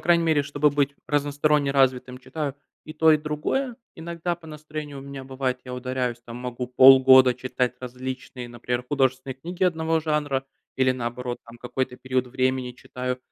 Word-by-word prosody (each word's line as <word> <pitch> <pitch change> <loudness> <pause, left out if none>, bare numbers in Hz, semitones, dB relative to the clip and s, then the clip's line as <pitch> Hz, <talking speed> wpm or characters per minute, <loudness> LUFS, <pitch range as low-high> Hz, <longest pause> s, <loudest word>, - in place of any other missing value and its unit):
крайней 170 -1 +3
мере, 155 -3 +3
чтобы 145 +1 +1
быть 140 -1 0
разносторонне 145 0 +1
развитым, 130 -2 +1
читаю 140 +2 -4 0.3
и 155 - -8
то, 160 0 +5
и - - +6
другое. 155 - -2 0.2
Иногда 170 +1 -3
по 170 -1 -16
настроению 150 -2 -7
у - - -7
меня 140 -1 -8
бывает, 130 -1 -2
я 125 -1 -6
ударяюсь 125 -1 -2
там, 115 - -8
могу 125 0 -4
полгода 130 0 +8
читать 125 0 -2
различные, 130 0 -6
например, 120 +1 -3
художественные 130 -2 0
книги 175 +7 -3
одного 160 -2 +1
жанра 150 -4 -1 0.3
или, 130 -1 +3
наоборот 120 0 -4
там, 115 0 -13
какой-то 125 +1 -3
период 130 0 -1
времени 130 0 -1
читаю 125 +1 -5
130 Hz, 160 wpm, -25 LUFS, 125-150 Hz, 0.3 s, полгода